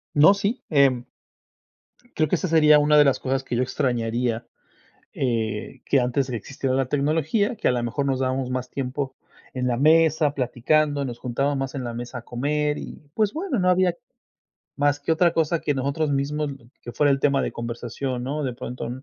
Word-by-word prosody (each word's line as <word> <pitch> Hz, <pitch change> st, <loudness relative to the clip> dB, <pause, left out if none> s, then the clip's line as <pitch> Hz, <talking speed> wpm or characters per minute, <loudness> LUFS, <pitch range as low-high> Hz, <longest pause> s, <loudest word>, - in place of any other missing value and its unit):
No, 155 Hz, +7 st, +7 dB
sí, 200 Hz, +5 st, -2 dB
em 135 Hz, -5 st, +3 dB, 1.1 s
creo 155 Hz, -1 st, +3 dB
que -, -, -7 dB
esa 185 Hz, -, -2 dB
sería 155 Hz, -2 st, +6 dB
una 150 Hz, +1 st, +4 dB
de 150 Hz, -, +7 dB
las 135 Hz, -, +2 dB
cosas 135 Hz, +1 st, -1 dB
que 120 Hz, -, -4 dB
yo 125 Hz, -, +1 dB
extrañaría, 120 Hz, -3 st, -1 dB, 0.7 s
eh, 115 Hz, 0 st, -2 dB
que 135 Hz, -, +3 dB
antes 125 Hz, +2 st, 0 dB
de 130 Hz, -, -6 dB
que 120 Hz, -, -2 dB
existiera 130 Hz, +3 st, -3 dB
la 135 Hz, -1 st, +1 dB
tecnología, 155 Hz, -, 0 dB
que 220 Hz, -, 0 dB
a -, -, +4 dB
la 125 Hz, -1 st, 0 dB
mejor 130 Hz, +4 st, -2 dB
nos 135 Hz, -1 st, 0 dB
dábamos 130 Hz, 0 st, -1 dB
más 130 Hz, 0 st, -3 dB
tiempo 135 Hz, 0 st, -3 dB, 0.4 s
en 125 Hz, -1 st, -2 dB
la 125 Hz, -1 st, +1 dB
mesa, 155 Hz, +1 st, +4 dB
platicando, 145 Hz, +3 st, +1 dB
nos 120 Hz, -3 st, -5 dB
juntábamos 135 Hz, +3 st, -1 dB
más 135 Hz, 0 st, -3 dB
en 130 Hz, -2 st, -4 dB
la 120 Hz, -, -4 dB
mesa 120 Hz, +2 st, -6 dB
a -, -, -10 dB
comer 150 Hz, +5 st, -1 dB
y, -, -, -8 dB
pues 215 Hz, +1 st, 0 dB
bueno, 320 Hz, -, -2 dB
no 180 Hz, 0 st, +2 dB
había 180 Hz, -1 st, +3 dB, 0.8 s
más 145 Hz, 0 st, +2 dB
que 145 Hz, +3 st, 0 dB
otra 170 Hz, +1 st, +3 dB
cosa 165 Hz, 0 st, +1 dB
que 145 Hz, -, -1 dB
nosotros 140 Hz, +3 st, -1 dB
mismos 145 Hz, +1 st, -1 dB, 0.3 s
que 120 Hz, -, -8 dB
fuera 145 Hz, -1 st, +3 dB
el 135 Hz, -, 0 dB
tema 140 Hz, -1 st, +2 dB
de -, -, -3 dB
conversación, 120 Hz, +2 st, -4 dB
¿no?, 145 Hz, +3 st, -3 dB
de 125 Hz, -2 st, -2 dB
pronto, 125 Hz, +1 st, -6 dB
140 Hz, 200 wpm, -24 LUFS, 125-150 Hz, 1.1 s, No